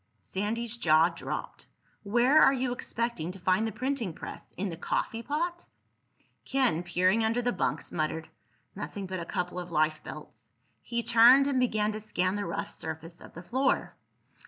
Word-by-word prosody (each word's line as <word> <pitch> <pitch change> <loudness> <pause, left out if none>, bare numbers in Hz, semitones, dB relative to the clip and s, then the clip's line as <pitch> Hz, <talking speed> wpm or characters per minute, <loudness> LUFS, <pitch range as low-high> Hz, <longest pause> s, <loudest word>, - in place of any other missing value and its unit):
Sandy's 225 +4 -2
jaw 160 -5 +5
dropped. - - -6 0.3
"Where 240 +8 +4
are - - +7
you 255 -2 -1
expecting 235 -8 -3
to 195 - -12
find 185 +5 +2
the - - -3
printing 255 -8 -2
press? - - -9
In 195 +2 -2
the 165 - -5
coffeepot?" 300 - -2 0.8
Ken, 260 -11 +1
peering 185 +5 +2
under 230 +2 +1
the 245 - +2
bunks, 180 - -2
muttered, 160 0 -2 0.5
"Nothing 200 -1 -5
but 185 0 -4
a 170 - -5
couple 180 +1 -3
of 180 0 -6
life 155 -1 +1
belts." 115 -7 -10 0.3
He 235 -1 -3
turned 240 +4 +7
and 275 -2 +1
began 215 -4 +1
to 215 - -5
scan 185 -3 -1
the 205 - -2
rough 170 - -4
surface 160 +2 -7
of - - -13
the 170 - -8
floor. 260 +7 0
210 Hz, 165 wpm, -29 LUFS, 175-240 Hz, 0.8 s, are